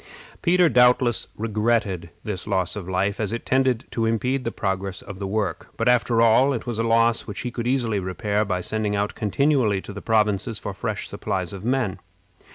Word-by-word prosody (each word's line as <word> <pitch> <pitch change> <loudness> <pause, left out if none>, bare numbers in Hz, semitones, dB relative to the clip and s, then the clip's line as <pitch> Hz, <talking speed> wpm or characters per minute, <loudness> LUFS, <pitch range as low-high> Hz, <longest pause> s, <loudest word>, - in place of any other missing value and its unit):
Peter 180 0 +4
doubtless 125 -3 +4
regretted 105 -5 0
this 105 -4 -5
loss 95 -3 0
of 95 -3 -6
life, 95 +2 0
as 105 -3 0
it 115 - -4
tended 130 -2 +1
to 115 -1 0
impede 125 +4 0
the 115 - -2
progress 95 -1 -3
of 100 -1 -9
the 100 - -3
work; 100 -2 -2
but, - - 0
after 120 -1 +3
all, 130 +5 +5
it 120 - -4
was 120 -2 -3
a - - +2
loss 115 0 +3
which 105 - -5
he 125 - -4
could 120 0 -4
easily 120 -5 +1
repair 100 +3 -1
by 90 -3 -2
sending 105 +2 -1
out 105 +1 -1
continually 120 -2 +1
to 100 - -9
the 100 - -7
provinces 105 -4 +1
for - - -5
fresh - - -3
supplies 95 -2 -3
of 95 0 -8
men. 120 -5 0
110 Hz, 195 wpm, -23 LUFS, 100-120 Hz, -, all